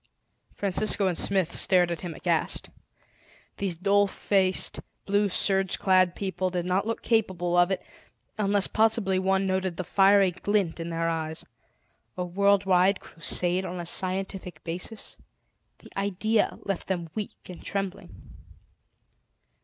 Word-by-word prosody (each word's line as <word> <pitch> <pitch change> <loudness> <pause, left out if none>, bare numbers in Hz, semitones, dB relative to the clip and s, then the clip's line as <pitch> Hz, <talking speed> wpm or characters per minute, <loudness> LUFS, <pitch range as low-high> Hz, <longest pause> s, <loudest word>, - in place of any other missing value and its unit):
Francisco 200 +1 0
and 185 -2 +1
Smith 190 -1 0
stared 180 -2 +3
at 170 - -4
him 175 -3 -6
aghast. - - -1 0.9
These 195 -3 -2
dull 200 +3 +3
faced, 190 -1 +1 0.3
blue 205 +1 +2
sergeclad 190 -1 +3
people 185 -2 -2
did 175 -1 -3
not 185 +3 0
look 230 - -3
capable 185 -6 +1
of 175 0 +5
it; 190 - -2 0.5
unless 205 -2 +2
possibly 215 -4 +2
one 190 +1 +1
noted 190 -2 -1
the 185 - -2
fiery 195 +1 +4
glint 185 -1 -1
in 165 0 -4
their 165 0 -1
eyes. 160 -1 -3 0.7
A 180 - -1
worldwide 190 0 +3
Crusade 175 +2 -1
on 180 -1 -5
a 175 - -5
scientific 185 +1 -3
basis! 180 +6 -4 0.6
The - - -17
idea 205 +2 0
left 195 -3 -3
them 175 -3 -3
weak 215 -2 -4
and 180 - -10
trembling. 195 -2 -6
190 Hz, 130 wpm, -27 LUFS, 175-200 Hz, 0.9 s, of